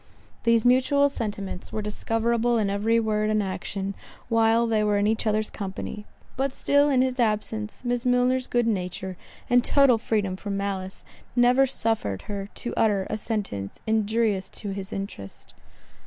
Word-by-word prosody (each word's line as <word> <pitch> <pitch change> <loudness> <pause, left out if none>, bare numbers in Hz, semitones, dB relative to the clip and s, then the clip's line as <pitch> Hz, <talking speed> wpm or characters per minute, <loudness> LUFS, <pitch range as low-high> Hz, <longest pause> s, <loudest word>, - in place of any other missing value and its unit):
These 230 -1 +4
mutual 270 +3 +4
sentiments 205 -7 -5
were 215 - -3
discoverable 230 +3 0
in 205 -3 +1
every 220 +3 +2
word 215 -1 0
and 215 -1 +2
action, 195 +1 -4 0.4
while 230 0 +3
they 220 -2 +1
were 210 -1 +2
in 205 - +2
each 220 +1 0
other's 215 0 +1
company; 205 +1 -6 0.3
but 270 +1 0
still 285 +2 +3
in 260 -2 +4
his 260 0 -2
absence, 215 0 -1
Miss 245 0 0
Milner's 250 0 +2
good 240 -1 +1
nature, 190 -3 -2 0.3
and 245 0 +4
total 275 -5 +4
freedom 205 -4 -1
from 200 0 -4
malice, 195 -1 -4 0.3
never 250 +2 +5
suffered 220 - -1
her 200 -1 -5
to 240 - -4
utter 205 -4 +2
a 215 - -1
sentence 195 - -4
injurious 220 -2 +1
to 205 - -7
his 195 +1 -6
interest. 195 - -7
220 Hz, 155 wpm, -25 LUFS, 200-240 Hz, 0.4 s, never